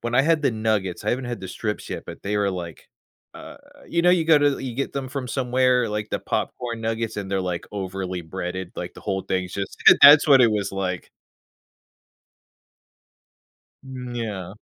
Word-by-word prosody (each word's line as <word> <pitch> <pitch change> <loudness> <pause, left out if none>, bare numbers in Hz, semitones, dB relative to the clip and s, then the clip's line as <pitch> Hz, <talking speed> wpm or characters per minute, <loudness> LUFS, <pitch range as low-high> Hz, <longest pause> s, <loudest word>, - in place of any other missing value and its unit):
when 120 0 -3
I 135 - +5
had 160 0 +2
the 135 - +3
nuggets, 110 -4 -1
I - - +1
haven't 125 0 -2
had 120 -1 -4
the 95 - -6
strips 105 +2 -4
yet, - - -5
but - - -10
they 105 +1 -2
were 100 -1 +1
like, 85 -4 -7 0.5
uh - - -11 0.3
you 170 - +1
know, 175 - +5
you 175 -3 +3
go 160 -2 +6
to 145 -1 +2
you 130 -3 -5
get 140 - -2
them 135 -2 -4
from 135 -2 -5
somewhere, 125 -2 +1
like 105 0 -3
the - - -1
popcorn 120 -2 -3
nuggets, 115 0 -2
they're, 95 -1 -2
like, 90 -2 -4
overly 95 -2 -4
breaded, 90 +2 -5
like, 90 - -6
the - - -12
whole 95 -2 -2
thing's 95 -1 -3
just 100 -1 -5
So, - - +11
that's 145 +2 +10
what 135 -2 +7
it 115 - +5
was 105 -2 -1
like. 95 -2 -3 2.7
Mm, 125 -2 -7
yeah. 100 -6 -5
110 Hz, 190 wpm, -23 LUFS, 95-130 Hz, 2.7 s, So